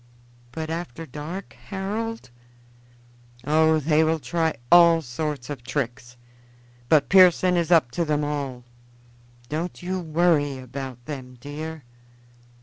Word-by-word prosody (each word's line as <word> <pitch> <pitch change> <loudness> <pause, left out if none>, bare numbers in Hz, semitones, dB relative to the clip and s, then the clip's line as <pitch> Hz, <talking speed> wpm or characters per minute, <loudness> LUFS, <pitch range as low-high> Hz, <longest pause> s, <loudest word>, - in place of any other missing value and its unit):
"But 160 +4 -5
after 165 -2 -5
dark, 155 +7 -7
Harold?" 210 - -4 1.1
"Oh, 160 +3 +3
they 155 +1 +3
will 160 +1 +2
try 160 0 -1 0.2
all 170 -2 +7
sorts 140 0 -4
of 145 -4 -6
tricks; 120 -3 -4 0.7
but 155 -3 +4
Pearson 185 -1 +6
is 170 -1 0
up 160 -8 +4
to 170 - -1
them 150 -1 0
all. 140 -4 -3 0.8
Don't 165 +6 -4
you 185 +1 -2
worry 160 -4 +1
about 130 -1 -8
them, 130 -4 -8
dear." 155 +3 -7
155 Hz, 120 wpm, -24 LUFS, 140-170 Hz, 1.1 s, all